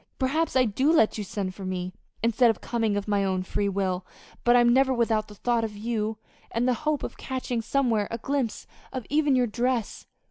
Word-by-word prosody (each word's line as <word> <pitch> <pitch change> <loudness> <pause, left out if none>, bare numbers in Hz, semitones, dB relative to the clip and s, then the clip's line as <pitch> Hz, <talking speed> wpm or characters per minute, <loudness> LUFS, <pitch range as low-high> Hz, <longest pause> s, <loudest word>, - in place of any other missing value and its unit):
Perhaps 295 +5 0
I 255 -1 +5
do 260 +8 +2
let 225 -9 +3
you - - -2
send 195 -1 -4
for 195 - -9
me, 185 -1 -3 0.3
instead 235 +1 +4
of 225 - 0
coming 225 -4 0
of 205 - -3
my 205 -1 +2
own 185 -1 0
free 200 +2 -1
will; 190 -2 -1 0.4
but 240 0 +5
I'm 240 -1 +5
never 265 +1 +4
without 225 -3 +1
the 210 - -12
thought 235 +2 0
of 210 -2 -4
you, 220 0 -2 0.3
and 235 +2 0
the 255 - +4 0.2
hope 300 -2 0
of - - -5
catching 255 -3 -3
somewhere 230 -4 +1
a 230 - -3
glimpse 265 -1 -2 0.3
of 255 -4 -5
even 295 -2 +3
your 250 -1 +3
dress. 240 0 -2
230 Hz, 210 wpm, -26 LUFS, 205-255 Hz, 0.4 s, I